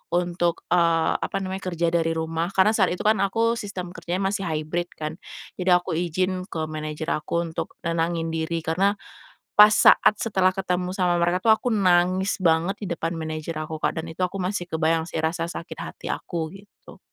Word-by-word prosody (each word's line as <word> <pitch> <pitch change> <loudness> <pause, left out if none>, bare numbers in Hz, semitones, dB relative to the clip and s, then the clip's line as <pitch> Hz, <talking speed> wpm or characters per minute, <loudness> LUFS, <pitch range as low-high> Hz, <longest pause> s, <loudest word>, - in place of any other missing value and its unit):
untuk, 175 -1 0
eee, 170 -2 +3
apa - - -3
namanya 190 +1 -5
kerja 170 -1 0
dari 165 -1 +1
rumah, 165 +2 -2
karena 195 +3 +5
saat 190 -4 +3
itu - - -7
kan 215 +1 +4
aku 230 +4 +1
sistem 185 -3 -6
kerjanya 180 +3 -2
masih 195 -1 -2
hybrid 160 +3 -2
kan, 155 +1 -5 0.4
jadi 180 -1 +4
aku - - -6
izin 185 +2 -1
ke 160 -5 -4
manajer 155 +1 -4
aku 170 +3 -1
untuk - - -5
nenangin 165 0 0
diri. 165 +1 -2
Karena 195 +6 +2 0.6
pas 210 +1 +9
saat 215 - +6
setelah 190 -4 +2
ketemu 180 -1 -1
sama 180 -2 +2
mereka 175 +2 +2
tuh 220 - +8
aku 245 - -3
nangis 185 0 +3
banget 170 +3 +2
di - - -3
depan 165 +1 -1
manager 155 0 -4
aku, 160 - -5
Kak, - - 0
dan 165 - -9
itu 170 - -8
aku 195 - -7
masih 180 -1 -2
kebayang 160 0 +1
sih 160 - -4
rasa 165 +1 -1
sakit 170 - -7
hati - - -7
aku 160 -2 -4
gitu. 200 +1 -15
175 Hz, 185 wpm, -24 LUFS, 165-190 Hz, 0.6 s, pas